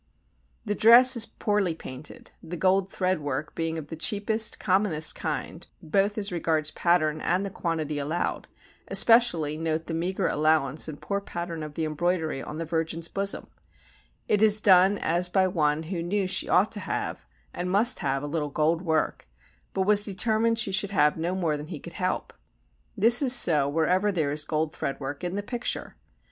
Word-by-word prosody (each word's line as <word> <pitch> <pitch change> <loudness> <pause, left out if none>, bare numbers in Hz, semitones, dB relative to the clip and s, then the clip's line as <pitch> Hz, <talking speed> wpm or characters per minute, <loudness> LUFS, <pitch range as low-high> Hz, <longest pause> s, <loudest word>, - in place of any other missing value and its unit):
The 205 - -1
dress 240 +5 +6
is 230 -1 +3
poorly 205 -5 -1
painted, 130 -1 -9
the 175 +1 -7
gold 190 +2 +1
thread 185 -2 -1
work 145 +1 -4
being 165 0 -3
of 150 -2 -8
the 160 - -6
cheapest, 215 +5 +2
commonest 185 -5 +1
kind, 160 +2 -5
both 195 +5 0
as 205 -2 -2
regards 160 -3 -1
pattern 155 -3 0
and 185 +3 0
the 195 - -5
quantity 155 -5 -3
allowed; 155 +5 -3 0.4
especially 175 -11 +3
note 160 0 -2
the 165 - -5
meagre 175 +3 -2
allowance 155 -2 +1
and 150 -2 -8
poor 200 0 -3
pattern 170 -4 -6
of 150 -1 -8
the 160 - -2
embroidery 160 -2 -2
on 150 - -8
the 165 - -4
virgin's 165 0 -2
bosom; 195 +2 -2 0.8
it 210 - +1
is 215 -1 +5
done 195 0 +5
as 175 +1 0
by 190 0 +2
one 155 -3 0
who 170 +1 -5
knew 190 +3 -1
she 185 - +1
ought 190 +4 +3
to 210 - -4
have, 165 - -5 0.3
and 180 +1 -4
must 215 +6 +3
have, 135 0 -2
a - - -3
little 150 0 -3
gold 155 +3 0
work, 160 - -2 0.4
but 190 - -1
was 205 +1 +4
determined 220 +3 +1
she 220 -3 +2
should 195 +1 +2
have 150 -7 +2
no 170 +3 -3
more 165 -5 -1
than 150 +1 -7
he 160 -3 -7
could 170 - -11
help. 185 +1 -3 0.6
This 230 +5 +6
is 265 -2 +6
so 150 - +4
wherever 180 +7 +1
there 155 -7 -1
is 150 +1 -2
gold 155 0 -2
thread 140 - -4
work 145 +2 -6
in 175 +1 -3
the 205 - -3
picture. 240 +3 -3
175 Hz, 185 wpm, -26 LUFS, 155-200 Hz, 0.8 s, dress